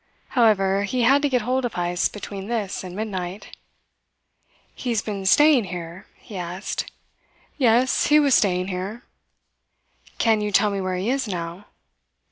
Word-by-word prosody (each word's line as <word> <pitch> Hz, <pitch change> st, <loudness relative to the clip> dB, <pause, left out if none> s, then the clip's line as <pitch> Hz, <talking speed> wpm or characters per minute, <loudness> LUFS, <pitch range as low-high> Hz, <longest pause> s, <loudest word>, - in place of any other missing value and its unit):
However, 200 Hz, -5 st, +3 dB
he 240 Hz, +5 st, -1 dB
had 275 Hz, +4 st, +5 dB
to 290 Hz, -, +1 dB
get 250 Hz, -4 st, +1 dB
hold 255 Hz, +3 st, 0 dB
of 245 Hz, -, -3 dB
Heyst 175 Hz, 0 st, 0 dB
between 200 Hz, -1 st, -7 dB
this 215 Hz, -5 st, -3 dB
and 180 Hz, -1 st, -8 dB
midnight: 195 Hz, -2 st, -5 dB, 1.2 s
"He 250 Hz, -, -5 dB
has 225 Hz, -3 st, 0 dB
been 200 Hz, -3 st, -4 dB
staying 295 Hz, 0 st, +5 dB
here?" 175 Hz, 0 st, -8 dB
he 210 Hz, -5 st, -10 dB
asked. 180 Hz, +2 st, -4 dB, 0.7 s
"Yes, 250 Hz, 0 st, +3 dB
he 300 Hz, 0 st, +6 dB
was 285 Hz, -3 st, +3 dB
staying 185 Hz, -3 st, +2 dB
here." 195 Hz, +6 st, -5 dB, 1.1 s
"Can 220 Hz, -2 st, +2 dB
you 210 Hz, 0 st, -2 dB
tell 205 Hz, +1 st, +3 dB
me 200 Hz, -1 st, -2 dB
where 185 Hz, -1 st, -2 dB
he 195 Hz, +7 st, -1 dB
is 270 Hz, -3 st, -1 dB
now?" 175 Hz, 0 st, -5 dB
205 Hz, 155 wpm, -23 LUFS, 185-240 Hz, 1.2 s, he